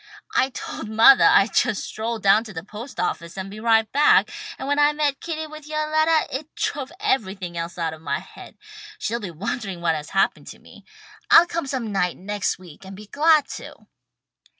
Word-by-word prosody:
"I 260 - +2
told 225 -4 -7
mothah 225 +5 +7
I'd 200 +3 +4
just 205 - +1
stroll 225 +2 -4
down 205 +1 +4
to 215 - -10
the 160 -2 -6
post 220 +6 -9
office 170 0 -3
and 190 +1 -6
be 210 - -9
right 225 0 +3
back, 290 +2 +4 0.3
and 265 - -6
when 285 +1 +1
I 295 0 +5
met 295 -2 -1
Kitty 315 -2 -4
with 310 -1 -11
yoah 305 0 -2
lettah 315 -3 +2
it 310 +1 -19
drove 280 -1 -3
everything 200 - -2
else 170 +1 -5
out 165 -2 -2
of 160 - -12
my - - -2
head. - - -13 0.4
She'll 235 +2 -2
be 205 -5 -6
wondering 190 +3 -5
what 170 -1 +1
has 150 -1 -5
happened 195 - 0
to - - -10
me. - - -17 0.4
I'll 335 - +8
come 335 -4 -4
some 255 -5 -3
night 180 -3 0
next 205 +1 -2
week 180 -2 -15
and 190 0 -10
be 210 +2 -11
glad 305 +6 +3
to." - - -10
220 Hz, 200 wpm, -23 LUFS, 190-290 Hz, 0.4 s, I'll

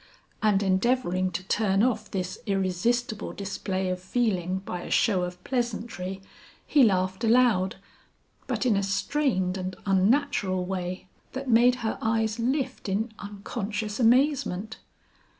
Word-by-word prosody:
And 205 -2 +3
endeavoring 190 -1 +1
to 180 0 -4
turn 195 0 +1
off 220 -4 0
this 185 -1 -4
irresistible 205 +4 0
display 190 -1 -3
of 185 0 -3
feeling 185 -4 0
by 180 - -4
a - - -8
show 195 -5 +3
of 180 0 -4
pleasantry 215 -6 -3 0.4
he 295 - +4
laughed 190 -2 +2
aloud, 225 -5 +3 0.7
but - - -1
in 235 -4 +3
a 200 - +2
strained 195 -1 0
and 185 0 -4
unnatural 195 -1 +2
way 185 0 -4 0.3
that 265 -1 -3
made 240 +2 +6
her 220 - -1
eyes 220 0 0
lift 260 -1 -1
in 215 +4 -1
unconscious 205 +1 -4
amazement. 240 -4 +2
205 Hz, 130 wpm, -27 LUFS, 185-240 Hz, 0.7 s, made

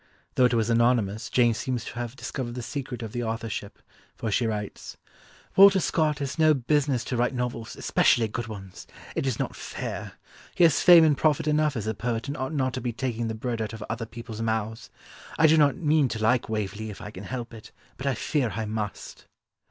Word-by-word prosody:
Though 125 - +4
it 125 - +3
was 115 0 +1
anonymous, 115 -2 +2
Jane 120 -2 +3
seems 125 +1 -3
to - - -7
have 120 +1 -4
discovered 120 -3 -5
the 125 - -5
secret 125 -1 -5
of 110 - -6
the 120 +1 -3
authorship, 115 -3 -4 0.4
for 110 - -3
she 115 +3 +1
writes: 105 -2 -5 0.6
"Walter 195 0 +8
Scott 155 -3 +1
has 140 +2 -4
no 155 -1 +5
business 140 -1 +1
to 125 - -3
write 120 +2 +1
novels, 120 -2 -3
especially 115 -2 +3
good 115 +2 -4
ones. 95 -4 -9 0.3
It - - -1
is 130 - 0
not - - -3
fair. - - -6 0.4
He - - +4
has 165 -3 +5
fame 175 -2 +9
and 155 -2 +4
profit 155 +2 +2
enough 150 -1 +2
as 110 - -3
a 110 - -1
poet 115 +2 -3
and 140 - -3
ought 130 0 -3
not 130 -4 0
to - - -4
be 120 0 -2
taking 120 -1 -3
the 110 - -3
bread 115 0 -3
out 110 0 -3
of 110 -1 -7
other 115 +1 -4
people's 115 -1 -8
mouths. 110 0 -2 0.5
I 160 - +5
do 160 0 +6
not 145 -3 +4
mean 155 -4 +2
to 115 - -4
like 115 +3 +2
Waverley 105 0 -3
if 105 - -8
I 105 +1 -8
can 95 -1 -9
help 120 -1 -5
it, 110 -2 -12 0.3
but 135 - -4
I 135 - +1
fear 130 -1 -1
I 110 - -2
must." 105 -1 -5
120 Hz, 215 wpm, -26 LUFS, 110-135 Hz, 0.6 s, fame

